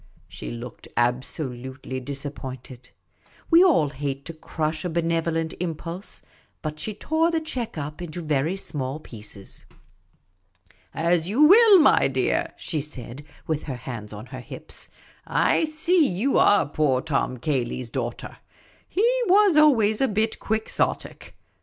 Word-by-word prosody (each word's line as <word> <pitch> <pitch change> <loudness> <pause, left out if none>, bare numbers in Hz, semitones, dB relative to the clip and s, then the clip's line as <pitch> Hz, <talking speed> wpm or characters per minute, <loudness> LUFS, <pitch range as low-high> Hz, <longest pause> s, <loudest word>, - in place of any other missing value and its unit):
' - - -33
' - - -31
She - - -8
looked 120 0 -8
absolutely 130 +1 -2
disappointed; 130 -2 -7 0.6
we 335 +2 +8
all 270 - +4
hate 140 0 -4
to 165 - -6
crush 155 0 -3
a 180 - -2
benevolent 165 -1 0
impulse; 170 +2 -5 0.4
but 155 -1 -4
she 215 +4 -4
tore 315 +8 +1
the 330 -1 +1
cheque 255 - -5
up 150 +3 -5
into 175 0 -6
very 155 +3 0
small 140 -6 -3
pieces. 105 -7 -9 0.7
" 95 0 -35 0.2
As 175 0 +2
you 245 +9 +4
will, 415 +5 +8
my 330 - +5
dear," - - 0
she 155 -4 -2
said, 140 -2 -8 0.2
with 155 -2 -1
her 135 - -4
hands 115 -4 -7
on 105 +1 -8
her 130 0 -8
hips; - - -9 0.4
"I - - +2
see 315 +1 +2
you 215 +10 0
are 205 -8 +5
poor 145 -3 +1
Tom 140 -4 -1
Cayley's 125 -3 -2
daughter. - - -4 0.5
He 415 +5 +2 0.2
was 395 -2 +5
always 235 -9 +4
a 270 - +4
bit 215 +1 -1
Quixotic." 220 0 -2
155 Hz, 145 wpm, -24 LUFS, 130-215 Hz, 0.7 s, we